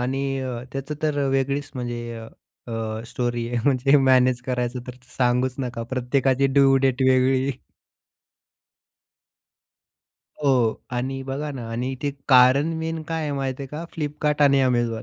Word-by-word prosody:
आणि 130 +2 -1 0.5
त्याचं 135 +2 -4
तर 150 -2 0
वेगळीच 135 +1 -1
म्हणजे 120 -2 -5 0.5
अ, 110 -1 -3
स्टोरी 120 -1 -2
आहे. 120 0 -1
म्हणजे 135 +1 +4
मॅनेज 130 -2 +4
करायचं 125 -1 -2
तर 125 - -7 0.2
सांगूच 125 0 +1
नका. 125 -3 -3
प्रत्येकाची 130 +1 +1
ड्यू 135 0 +4
डेट 135 -1 +1
वेगळी. 130 +1 +3 2.9
हो. 125 -6 +2
आणि 130 +2 -3
बघा 135 +3 -4
ना, 120 -4 -7
आणि 120 +3 -2
इथे 140 +2 -3 0.2
कारण 130 +4 +5
मेन 160 0 -3
काय 165 0 -2
आहे, 150 -1 -2
माहिती 135 -1 -3
आहे - - -5
का? 150 +4 -6
फ्लिपकार्ट 150 -1 -1
आणि 140 -1 +5
Amazon. 120 -3 0
130 Hz, 135 wpm, -23 LUFS, 125-140 Hz, 2.9 s, कारण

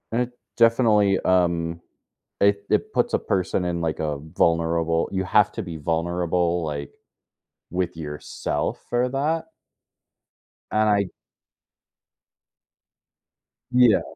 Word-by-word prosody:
It 125 +2 0 0.3
definitely, 110 -4 +4
um, 85 -2 +1 0.6
it 100 0 +3
it - - +1
puts - - +1
a - - +3
person 90 -1 -1
in, 85 -1 -1
like, 80 -1 -2
a 75 -2 -1
vulnerable 85 +1 +1
you 95 -1 -1
have 105 +2 +4
to 115 - -4
be 85 -3 -6
vulnerable, 85 +2 0
like, 70 -2 -4 0.8
with 90 -1 -2
yourself 75 -2 -4
for 120 +1 +1
that 155 +5 -1 1.3
and 110 0 +3
I 100 -2 +2 2.7
Yeah. 125 -4 +5
90 Hz, 105 wpm, -24 LUFS, 85-105 Hz, 2.7 s, Yeah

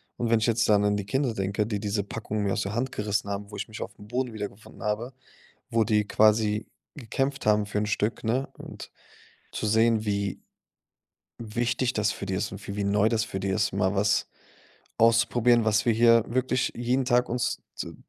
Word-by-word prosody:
Und 120 - -2
wenn 115 -1 +4
ich 110 - 0
jetzt 115 -1 +2
dann 105 -1 +4
an 105 0 +2
die 100 -1 -3
Kinder 130 +4 0
denke, 100 +1 -1
die 105 -3 -3
diese 100 -1 -1
Packung 110 0 -4
mir 100 -1 0
aus - - -1
der 100 +1 -3
Hand 130 +3 -1
gerissen 105 -1 -1
haben, 100 +1 -5
wo 105 - -7
ich - - -4
mich 110 -1 -9
aufm 105 0 -8
Boden 125 +2 -2
wiedergefunden 105 0 -8
habe, 105 +4 -2 0.6
wo 115 -1 +2
die 105 -2 +2
quasi 105 0 +3 0.3
gekämpft 135 +2 -2
haben 105 -1 +3
für 105 0 -4
'n 105 - +1
Stück, 105 +2 -1
ne? 125 +5 0
Und - - -10 0.6
zu - - -3
sehen, 110 0 +3
wie 100 -2 -1 1.0
wichtig 120 +3 -1
das 105 -4 +1
für 100 - -5
die 95 - -2
ist 100 +2 -2
und 100 0 -9
wie 100 - -5
wie 105 - -2
neu 105 +2 +3
das 110 -1 +1
für 95 - -5
die 95 +1 -3
ist, 100 +1 +1
mal 95 +1 +1
was 100 0 +2 0.7
auszuprobieren, 115 0 +4
was 110 0 +2
wir 115 - +5
hier 115 0 +5
wirklich 130 +1 0
jeden 125 +2 0
Tag 125 -1 +3
uns, 125 +1 -1
z - - -6
110 Hz, 205 wpm, -27 LUFS, 105-115 Hz, 1.0 s, wir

